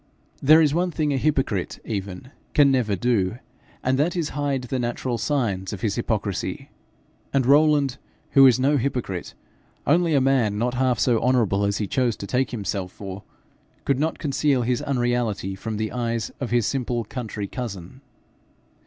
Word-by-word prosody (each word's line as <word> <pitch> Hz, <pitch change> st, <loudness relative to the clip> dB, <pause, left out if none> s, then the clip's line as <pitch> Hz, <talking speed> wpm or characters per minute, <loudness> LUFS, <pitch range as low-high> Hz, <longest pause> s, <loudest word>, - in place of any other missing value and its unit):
There 155 Hz, +4 st, +7 dB
is 145 Hz, -2 st, +2 dB
one 180 Hz, +2 st, +1 dB
thing 150 Hz, -3 st, -1 dB
a -, -, +1 dB
hypocrite 135 Hz, -, 0 dB
even 100 Hz, +3 st, -5 dB, 0.2 s
can 145 Hz, -2 st, +6 dB
never 120 Hz, -6 st, +1 dB
do, 105 Hz, -1 st, 0 dB, 0.5 s
and 130 Hz, +1 st, +1 dB
that 165 Hz, +5 st, +1 dB
is, 165 Hz, -4 st, -1 dB
hide 140 Hz, -2 st, -2 dB
the 125 Hz, +1 st, -3 dB
natural 120 Hz, 0 st, -2 dB
signs 105 Hz, -8 st, -1 dB
of 95 Hz, -, -7 dB
his 105 Hz, -3 st, 0 dB
hypocrisy; 105 Hz, -4 st, -3 dB, 0.6 s
and 135 Hz, -2 st, +1 dB
Rowland, 145 Hz, -1 st, +4 dB, 0.3 s
who 135 Hz, -, +6 dB
was 130 Hz, -2 st, +7 dB
no 140 Hz, +3 st, +3 dB
hypocrite, 120 Hz, -8 st, -3 dB, 0.5 s
only 165 Hz, +1 st, +3 dB
a -, -, +5 dB
man 130 Hz, -6 st, +2 dB
not 120 Hz, +3 st, 0 dB
half 130 Hz, -1 st, +1 dB
so 120 Hz, -1 st, +2 dB
honourable 115 Hz, -6 st, +2 dB
as 100 Hz, 0 st, 0 dB
he 105 Hz, -, -1 dB
chose 120 Hz, +1 st, 0 dB
to -, -, -6 dB
take 130 Hz, +5 st, 0 dB
himself 100 Hz, -5 st, -3 dB
for, 95 Hz, 0 st, -8 dB, 0.6 s
could 140 Hz, -2 st, +1 dB
not 160 Hz, +2 st, 0 dB
conceal 140 Hz, -3 st, +1 dB
his 120 Hz, 0 st, 0 dB
unreality 120 Hz, -7 st, -1 dB
from 105 Hz, +3 st, -5 dB
the 110 Hz, 0 st, -2 dB
eyes 115 Hz, -2 st, -2 dB
of 130 Hz, -, -3 dB
his 120 Hz, -1 st, +2 dB
simple 120 Hz, -2 st, -1 dB
country 110 Hz, -2 st, -5 dB
cousin. 100 Hz, 0 st, -7 dB
125 Hz, 170 wpm, -24 LUFS, 105-135 Hz, 0.6 s, There